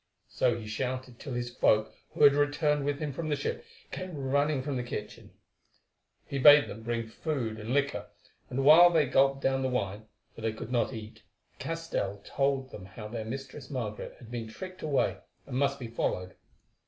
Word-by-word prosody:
So 120 Hz, -2 st, +1 dB
he 115 Hz, -, -7 dB
shouted 125 Hz, +2 st, -4 dB
till 140 Hz, -, -6 dB
his 120 Hz, 0 st, -3 dB
folk, 110 Hz, -2 st, +3 dB, 0.2 s
who -, -, 0 dB
had 140 Hz, -1 st, +9 dB
returned 145 Hz, 0 st, +1 dB
with 145 Hz, 0 st, 0 dB
him 150 Hz, -1 st, -3 dB
from 155 Hz, +3 st, -4 dB
the 150 Hz, -, +2 dB
ship, 145 Hz, -, -3 dB, 0.3 s
came 185 Hz, -4 st, -5 dB
running 140 Hz, +1 st, +1 dB
from 140 Hz, 0 st, -2 dB
the 125 Hz, -, -1 dB
kitchen. 105 Hz, -3 st, -7 dB, 1.0 s
He 140 Hz, -, -3 dB
bade 145 Hz, +2 st, +8 dB
them 110 Hz, -, -8 dB
bring 115 Hz, 0 st, -2 dB
food 115 Hz, -4 st, -3 dB
and 110 Hz, +2 st, -5 dB
liquor, 140 Hz, +1 st, 0 dB, 0.4 s
and 135 Hz, +2 st, -1 dB
while 165 Hz, +4 st, +9 dB
they 160 Hz, -4 st, +3 dB
gulped 135 Hz, +1 st, +3 dB
down 135 Hz, 0 st, +2 dB
the 130 Hz, -, 0 dB
wine, 110 Hz, -3 st, -2 dB, 0.3 s
for -, -, -11 dB
they 110 Hz, 0 st, -1 dB
could 110 Hz, +2 st, -7 dB
not 120 Hz, -2 st, +1 dB
eat, 110 Hz, -3 st, -9 dB, 0.4 s
Castell 165 Hz, -12 st, -3 dB
told 135 Hz, -1 st, 0 dB, 0.2 s
how 105 Hz, -1 st, -7 dB
their 110 Hz, -1 st, -4 dB
Mistress 135 Hz, +3 st, -7 dB
Margaret 115 Hz, -6 st, -4 dB
had 120 Hz, -1 st, -13 dB
been 115 Hz, -2 st, -4 dB
tricked 185 Hz, +10 st, -9 dB
away, 150 Hz, -3 st, +1 dB, 0.3 s
and 130 Hz, -, -6 dB
must 140 Hz, +1 st, +2 dB
be 130 Hz, -, -7 dB
followed. 90 Hz, -5 st, -2 dB
130 Hz, 185 wpm, -30 LUFS, 115-145 Hz, 1.0 s, had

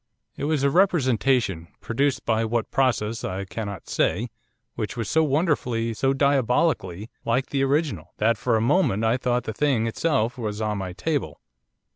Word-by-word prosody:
'It -, -, -4 dB
was 150 Hz, -2 st, 0 dB
a 140 Hz, -, +3 dB
representation, 130 Hz, -, +2 dB
produced 135 Hz, +4 st, -1 dB
by 115 Hz, -1 st, +1 dB
what 115 Hz, 0 st, -1 dB
process 115 Hz, -4 st, 0 dB
I 95 Hz, +1 st, -3 dB
cannot 100 Hz, -2 st, -6 dB
say, 110 Hz, +9 st, 0 dB, 0.4 s
which -, -, -4 dB
was 115 Hz, -3 st, -2 dB
so 160 Hz, +6 st, +3 dB
wonderfully, 135 Hz, -7 st, 0 dB
so 135 Hz, +4 st, +1 dB
diabolically, 130 Hz, -, +1 dB
like 125 Hz, +3 st, 0 dB
the 135 Hz, -1 st, +1 dB
original, 135 Hz, -, -1 dB
that 115 Hz, +2 st, +3 dB
for 115 Hz, +3 st, 0 dB
a -, -, 0 dB
moment 120 Hz, -, +2 dB
I 115 Hz, +2 st, +2 dB
thought 125 Hz, -1 st, 0 dB
the 110 Hz, -, -4 dB
thing 130 Hz, -2 st, +1 dB
itself 120 Hz, -1 st, 0 dB
was 105 Hz, -2 st, -3 dB
on 105 Hz, -2 st, -1 dB
my 95 Hz, -2 st, -5 dB
table. 150 Hz, -, -2 dB
120 Hz, 165 wpm, -24 LUFS, 110-140 Hz, 0.4 s, a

